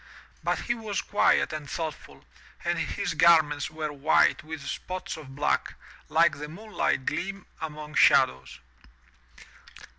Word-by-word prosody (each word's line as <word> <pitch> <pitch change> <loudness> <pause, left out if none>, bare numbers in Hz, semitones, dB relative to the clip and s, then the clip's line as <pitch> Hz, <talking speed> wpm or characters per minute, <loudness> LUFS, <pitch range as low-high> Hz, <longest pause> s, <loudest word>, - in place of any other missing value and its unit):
But - - 0
he 240 - -1
was 220 -4 -3
quiet 205 -5 +2
and 150 -2 -6
thoughtful, 160 -4 -6 0.4
and - - 0
his - - -2
garments 155 -4 +4
were 155 -1 -4
white 145 +2 +3
with 160 -1 -7
spots 185 0 -5
of 135 -4 -11
black, 145 +1 0 0.3
like 165 -2 +3
the 150 0 -6
moonlight 200 -6 -2
gleam 195 +1 -3 0.2
among 150 -1 -6
shadows. 65 - +3
155 Hz, 125 wpm, -27 LUFS, 150-170 Hz, 0.4 s, garments